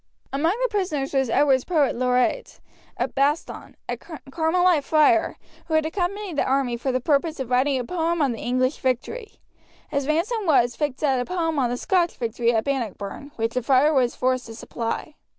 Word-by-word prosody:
Among 310 +5 +2
the - - +2
prisoners 320 -10 -2
was 265 -3 +1
Edward's 265 +1 +3
poet 310 -6 +1
laureate, 250 - 0 0.5
Baston, 285 +3 -1
a - - -2
Carmelite 320 +2 0
friar, 320 +3 +3 0.3
who 320 - 0
had 315 0 +2
accompanied 360 +1 -3
the - - +3
army 260 -2 0
for 250 +3 -2
the 255 - 0
purpose 300 +4 0
of 255 -2 -5
writing 265 +2 +2
a - - -2
poem 335 +4 -1
on 280 -4 +2
the 230 - -5
English 255 +3 0
victory. 340 - -2 0.6
His 280 -1 -1
ransom 380 +7 0
was 245 -6 +3
fixed 295 -2 -3
at 270 -3 +2
a 245 - -1
poem 325 -3 -1
on 250 -3 +1
the 245 - -2
Scotch 350 +3 +1
victory 235 0 0
at 220 -2 +1
Bannockburn, 260 0 -4
which 225 0 -2
the 250 - 0
friar 275 +5 +3
was 250 -4 +2
forced 255 -1 0
to 225 - -9
supply. 230 +6 -4
280 Hz, 185 wpm, -24 LUFS, 250-325 Hz, 0.6 s, Edward's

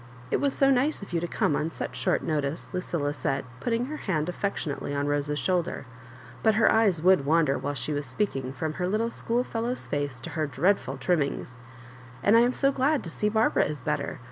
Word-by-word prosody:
" 125 0 -18
It - - +1
was 280 -1 +2
so 275 0 +4
nice 270 -1 +1
of 195 - -10
you 170 - +2
to 175 - -3
come 150 - +1
on 155 - 0
such - - -5
short - - +1
notice," 150 +1 -2
Lucilla 170 -5 -1
said, 135 -1 -2
put - - -3
ting 235 +1 +1
her 305 +3 -5
hand 165 - -1
affectionately 160 -7 -3
on 140 0 0
Rose's 145 0 0
shoulder; 175 -4 -1 0.6
but 220 -1 +4
her 220 - +5
eyes 200 -8 +3
would 185 -5 +5
wander 155 -1 +2
wliile 145 +1 -3
she 150 - -2
was 145 -1 -3
speaking 130 -4 -2
from 155 +4 -3
her 180 - +1
little 220 +4 0
schoolfellow's 240 +1 -2
face 145 -3 -3
to - - -7
her 155 -2 -1
dreadful 165 -3 +1
trimmings; 140 -4 -1 0.3
" 125 -1 -18
and 205 - +5
I - - +8
am 245 +2 +4
so 275 +1 +2
glad 275 +2 +1
to 165 - -6
seo^arbara 215 +4 +2
is 150 -3 -5
better. - - -2
165 Hz, 215 wpm, -27 LUFS, 145-220 Hz, 0.6 s, I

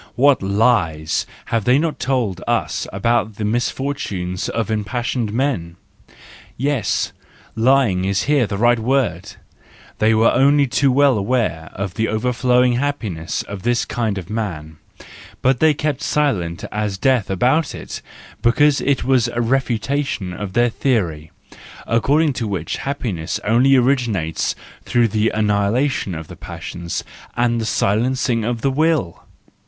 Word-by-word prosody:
What 140 +2 +4
lies 95 -7 +1 0.3
have 115 -3 +1
they 125 +2 +5
not 160 +1 -1
told 125 -9 -1
us - - -1
about 110 +2 0
the 105 - -3
misfortunes 105 -6 -2
of 115 -1 -2
impassioned 110 +2 -2
men! 110 -9 -1 0.8
Yes, 135 -3 0 0.4
lying 115 -5 +3
is 95 +1 0
here 145 -5 +2
the 100 0 -3
right 120 +2 +3
word: 130 +1 -1 0.7
they 110 +1 +4
were 110 +1 +4
only 140 +1 +4
too 135 +1 +2
well 135 -3 +4
aware 100 -7 -1
of 100 -2 -4
the 110 0 0
overflowing 125 +2 +2
happiness 105 - -2
of 100 -1 -8
this 120 +2 +1
kind 110 -4 -2
of 90 -4 -6
man, 85 -9 -4 0.7
but 130 -1 +3
they 155 -1 +4
kept 145 -2 -2
silent 95 - 0
as 105 -2 -2
death 125 0 +1
about 130 - +1
it; - - -7 0.4
because 145 +4 +3
it 140 -1 +1
was 130 -3 +3
a 120 - -3
refutation 125 -4 -1
of 95 +1 -6
their 120 +2 +3
theory, 85 - -1 0.6
according 145 +6 +2
to 115 -3 -3
which 90 -6 -3
happiness 120 - -3
only 125 +5 +4
originates 120 - +1 0.3
through 120 -2 +2
the 110 +2 +1
annihilation 105 - 0
of 80 -1 -7
the - - -10
passions 85 -1 -6 0.3
and 120 -1 +1
the - - -3
silencing 115 +3 +1
of 120 0 -2
the 135 - +1
will! 155 - 0
115 Hz, 140 wpm, -20 LUFS, 100-130 Hz, 0.8 s, they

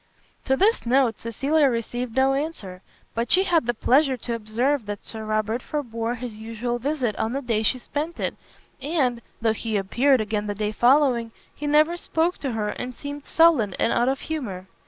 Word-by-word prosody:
To 265 0 +2
this 415 - +2
note 250 -2 +3
Cecilia 275 +6 +2
received 240 0 -3
no 265 +1 +4
answer: 270 - -4 0.3
but 230 +1 -2
she 375 - +6
had 340 -9 +2
the 240 - +2
pleasure 265 +3 +3
to 235 0 -4
observe 230 +3 -1
that 205 -1 -5
Sir 220 -1 -7
Robert 215 +2 -1
forbore 235 -5 -3
his 235 -3 -7
usual 230 +2 -3
visit 260 -5 -1
on 225 +2 -1
the 275 - -2
day 230 -3 0
she 225 - +2
sent 295 +6 -4
it, - - -1 0.5
and, 265 -6 0 0.2
though 225 -1 +3
he 220 -1 -2
appeared 250 +8 +3
again 210 -1 -2
the 205 - -2
day 210 +1 -1
following, 245 0 +3 0.2
he 295 - -5
never 305 +4 +4
spoke 335 +1 0
to 270 -4 -3
her 210 -2 -1
and 250 +3 -5
seemed 285 +1 -7
sullen 310 - +4
and - - +1
out 240 +2 +2
of 270 0 -2
humour. 230 -13 -4
245 Hz, 190 wpm, -24 LUFS, 220-285 Hz, 0.5 s, she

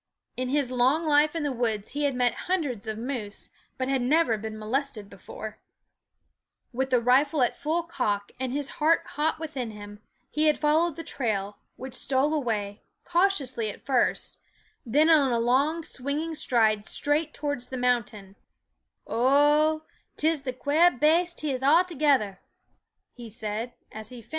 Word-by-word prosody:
In 255 0 -2
his 275 -2 0
long 260 +6 +2
life 300 +1 +3
in 325 - -2
the 290 - -1
woods 225 -4 -2
he 290 +1 -1
had 280 -2 0
met 245 -1 +2 0.2
hundreds 280 - -1
of 215 -1 -3
moose, 230 -4 -5 0.3
but 255 - -2
had 270 -1 +1
never 265 -1 +3
been 215 0 -6
molested 220 -1 -3
before. 215 +2 -9 1.1
With 265 +2 -1
the 250 -1 +3
rifle 265 +4 +3
at 245 - 0
full 335 +1 -1
cock 205 -12 -2
and 260 -1 -2
his 285 +1 -2
heart 320 +2 +4
hot 305 +2 0
within 295 -7 -5
him, 205 -1 -10 0.3
he 305 +1 +2
had 305 - +3
followed 310 +2 +2
the 330 - -7
trail, 210 -8 -3 0.2
which 260 0 -8
stole 265 +3 +1
away, 215 -8 -2 0.2
cautiously 310 - +1
at - - -9
first, 260 -3 0 0.5
then 295 +7 +4
in 320 -2 +7
a 260 -4 +1
long 280 +8 +1
swinging 295 +4 -3
stride 220 -7 +2
straight 300 +2 0
towards 285 -5 -4
the 260 - -6
mountain. 230 -6 -1
260 Hz, 130 wpm, -26 LUFS, 225-300 Hz, 1.1 s, in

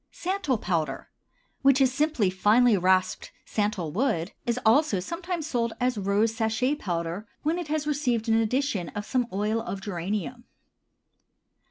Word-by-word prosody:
SANTAL 360 -8 -1
POWDER, 160 -9 -2 0.5
which 275 0 +5
is 260 -2 +3
simply 285 -9 +1
finely 215 +5 +4
rasped 185 0 +1
santal 205 -7 -1
wood, 185 - 0 0.2
is 235 0 +1
also 225 -2 +4
sometimes 340 - -4
sold 235 -6 -1
as 250 0 +1
rose 205 +2 +1
sachet 225 +4 +1
powder 175 - -3 0.2
when 320 +4 0
it 345 - -5
has 305 0 -1
received 250 -6 0
an 225 - +3
addition 225 - 0
of 205 - -4
some 250 -1 0
oil 210 +3 0
of 195 - -5
geranium. 205 +5 -4
225 Hz, 145 wpm, -26 LUFS, 195-275 Hz, 0.5 s, which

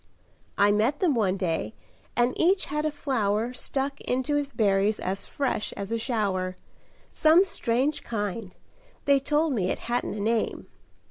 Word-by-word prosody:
I 205 +1 +5
met 225 +8 +2
them 345 -6 +3
one 200 -6 +1
day 165 - -2 0.4
and 245 +1 +2
each 370 +3 +3
had 300 +1 -2
a 310 - +1
flower 235 -5 -1
Stuck 275 +2 -3
into 260 +4 -1
his 290 -1 0
berries 205 -2 +2
as 190 +2 -3
fresh 275 -6 -2
as 200 +1 -5
a 230 - 0
shower; 195 -6 -1 0.6
Some 325 +5 +5
strange 265 -3 0
kind 210 -3 -4 0.5
they 280 -1 +5
told 300 +2 +1
me 190 -6 0
it - - -1
hadn't 240 -3 -2
a - - -5
name." 220 +2 0
235 Hz, 155 wpm, -26 LUFS, 205-285 Hz, 0.6 s, I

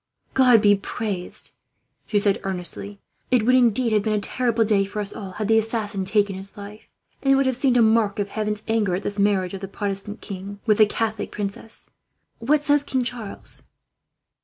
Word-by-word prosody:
"God 250 -4 +5
be 205 -1 +7
praised!" 200 -2 -4 0.6
she 210 - +1
said 200 -1 +2
earnestly. 195 +1 -5 0.3
"It 245 -4 +3
would 255 - +4
indeed 245 -1 +4
have 210 - +3
been 215 0 0
a - - +1
terrible 230 +1 0
day 205 -2 +3
for 200 +2 -5
us 205 -1 -3
all, 195 -3 -7
had 215 +1 -3
the 225 0 +5
assassin 215 -3 -3
taken 200 0 +1
his 195 +2 -7
life; 205 +1 -10 0.3
and 270 - +2
it - - +6
would 275 0 +3
have 260 -1 +1
seemed 255 -1 +2
a 235 - +6
mark 220 -2 +3
of 205 -1 -2
Heaven's 210 0 -3
anger 215 -5 +1
at 190 - -4
this 205 0 -3
marriage 200 -3 +2
of 195 - -6
the 195 - -4
Protestant 200 +2 -3
king 200 0 -7
with 215 -2 +3
a 215 - +7
Catholic 220 0 -2
princess. 205 +2 -6 0.5
What 290 +6 +2
says 290 0 +3
King 260 -3 -1
Charles?" 235 -4 -5
210 Hz, 200 wpm, -23 LUFS, 200-230 Hz, 0.6 s, be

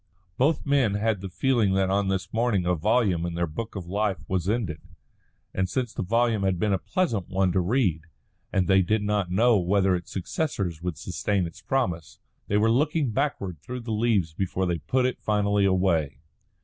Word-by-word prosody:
Both 140 - +1
men 135 -8 +2
had 105 -1 0
the 95 - -5
feeling 115 -1 +1
that 95 0 +1
on 100 0 +1
this 95 -1 -2
morning 110 -5 +1
a 90 - +2
volume 95 -1 +1
in 85 -1 -3
their 85 0 0
book 110 +9 -6
of 95 -3 -5
life 100 +1 -1
was 95 -1 -1
ended; 105 -9 -2 0.7
and 95 -1 -1
since 125 0 -2
the - - -3
volume 115 +2 +1
had 95 -2 +1
been 100 +3 +1
a 95 - +1
pleasant 110 - -1
one 95 -1 +1
to 95 - +1
read, 90 - +1 0.5
and 95 -3 +1
they 95 0 +5
did 105 +4 0
not 105 -3 0
know 110 +4 +4
whether 95 +1 +2
its 85 -1 -6
successors 95 - -3
would 90 -3 -3
sustain 95 +3 -1
its 80 - -9
promise, 90 - -2 0.3
they 100 - +1
were 110 +2 +3
looking 145 +1 +1
backward 105 - -2
through 125 +8 -6
the 115 -1 -6
leaves 105 -7 +1
before 95 +1 -1
they 85 -2 -1
put 125 - 0
it 130 - -2
finally 105 -1 +1
away. 90 -7 +1
100 Hz, 195 wpm, -26 LUFS, 90-115 Hz, 0.7 s, they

